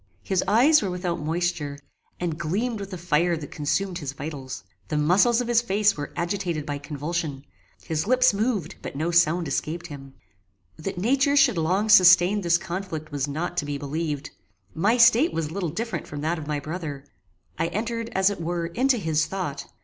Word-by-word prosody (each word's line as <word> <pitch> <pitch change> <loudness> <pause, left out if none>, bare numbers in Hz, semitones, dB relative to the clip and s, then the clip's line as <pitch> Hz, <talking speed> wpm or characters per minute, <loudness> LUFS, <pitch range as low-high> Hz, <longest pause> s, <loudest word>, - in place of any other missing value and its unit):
His 190 -2 0
eyes 255 +10 +5
were 200 - -2
without 180 -1 -3
moisture, 160 -2 -2 0.4
and 175 -3 -2
gleamed 210 +8 -1
with 200 -1 -6
the 185 - -6
fire 170 0 +1
that 150 -2 -8
consumed 180 +5 -1
his 140 -4 -5
vitals. 140 -2 -7 0.2
The 150 - -2
muscles 195 +11 +4
of 245 - -4
his 235 -1 +3
face 210 -2 +2
were 145 -1 -6
agitated 170 -4 -2
by 145 -2 -4
convulsion. 145 0 -4 0.4
His 160 +2 -2
lips 255 -1 +4
moved, 200 -5 -1
but - - -7
no 160 +4 -1
sound 170 0 +3
escaped 160 +5 -3
him. 135 -4 -10 0.6
That 175 +4 -5
nature 270 +8 +2
should 255 -10 +4
long 185 +7 +1
sustain 185 -1 +6
this 170 -2 +3
conflict 175 -3 -5
was 145 -1 -2
not 170 +5 -4
to 170 - 0
be 145 -1 -3
believed. 145 0 -4 0.4
My 210 +9 +2
state 240 +6 +5
was 160 -2 -2
little 180 -1 -2
different 180 0 -4
from 145 0 -6
that 160 +2 -1
of 150 - -8
my 150 -1 -1
brother. 150 -2 -6 0.5
I - - +1
entered, 230 +4 -3
as 190 +1 +3
it 195 - -6
were, 170 0 -2
into 250 +9 +1
his 160 -6 0
thought. 175 -8 -5
175 Hz, 185 wpm, -25 LUFS, 150-200 Hz, 0.6 s, sustain